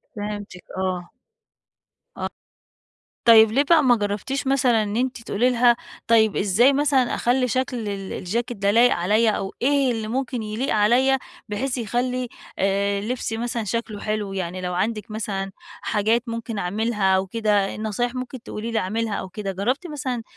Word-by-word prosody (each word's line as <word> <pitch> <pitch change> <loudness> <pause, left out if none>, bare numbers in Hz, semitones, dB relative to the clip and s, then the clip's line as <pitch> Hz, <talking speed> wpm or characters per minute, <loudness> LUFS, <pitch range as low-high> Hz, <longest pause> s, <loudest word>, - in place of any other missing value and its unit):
فهمتِك، 205 -3 -6
آه، 190 - -1 0.2
آه 175 -1 -11 2.2
طيب 225 -2 +8
ليه 275 +5 +3
بقى 315 +1 +5
ما 245 -3 +5
جربتيش 210 +6 -2
مثلًا 255 -5 +3
إن 205 0 -3
أنتِ 250 0 -1
تقولي 240 +5 +1
لها 240 -1 +4 0.3
طيب 220 -3 +4
إزاي 220 +8 +4
مثلًا 275 -3 +2
أخلّي 250 +1 +1
شكل 255 +1 -1
ال 195 -1 -5
الجاكيت 230 +5 -3
ده 200 0 +2
لايق 235 +3 +5
عليَّ، 215 +6 +3
أو 195 -2 -2
إيه 275 0 +3
اللي 225 -2 -3
ممكن 245 -1 -2
يليق 220 +6 -2
عليَّ، 245 +6 +4 0.3
بحيث 250 +6 -2
يخلي 250 +2 -1 0.3
آآ، 200 +1 +1
لبسي 225 0 -3
مثلًا 235 0 -2
شكله 215 0 -3
حلو 210 -2 -2
يعني 185 -1 -3
لو 180 0 -3
عندِك 215 +4 -2
مثلًا 195 -3 -3 0.3
حاجات 220 +3 +1
ممكن 230 -1 -4
أعملها 200 +1 +1
أو 190 +1 0
كده، 210 -2 +1
نصايح 220 +3 -2
ممكن 255 -1 -6
تقولي 225 +2 -5
لي 225 - +1
اعملها 220 +3 -2
أو 190 - -5
كده 195 +1 -4
جربتِ 250 - -1
مثلًا 255 -6 -3
225 Hz, 160 wpm, -23 LUFS, 205-245 Hz, 2.2 s, طيب